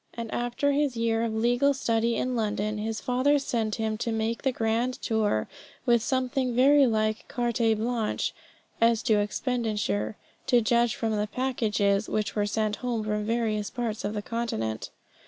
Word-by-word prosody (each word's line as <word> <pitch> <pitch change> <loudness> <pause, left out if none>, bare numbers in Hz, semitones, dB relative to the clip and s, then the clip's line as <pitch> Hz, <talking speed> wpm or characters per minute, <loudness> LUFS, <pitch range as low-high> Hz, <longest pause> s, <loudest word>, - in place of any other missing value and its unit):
And 230 -1 -5
after 245 +4 0
his 280 -3 0
year 230 -1 +1
of 230 -1 0
legal 245 +5 +2
study 230 -3 +1
in 255 0 -1
London 215 -1 -1
his 220 +1 -3
father 255 +4 +2
sent 230 -6 -1
him 220 -1 -2
to 230 - -1
make 225 +1 -1
the 265 - +1
grand 235 +2 0
tour, 215 - 0 0.4
with 235 -2 +4
something 255 0 0
very 275 +2 +6
like 215 -1 0
carte 240 -3 -1 0.2
blanche 225 0 -1 0.5
as 230 -1 +4
to 220 -4 +3
expenditure, 210 - -1 0.3
to 245 - +5
judge 235 +1 +2
from 220 -1 -1
the 210 0 0
packages 215 -5 0
which 215 -1 -1
were 205 -1 +1
sent 215 0 -1
home 240 -3 -2
from 210 0 -1
various 220 -2 0
parts 230 -3 -3
of 210 +1 -2
the 205 - -3
Continent. 110 - -3
230 Hz, 165 wpm, -27 LUFS, 215-245 Hz, 0.5 s, very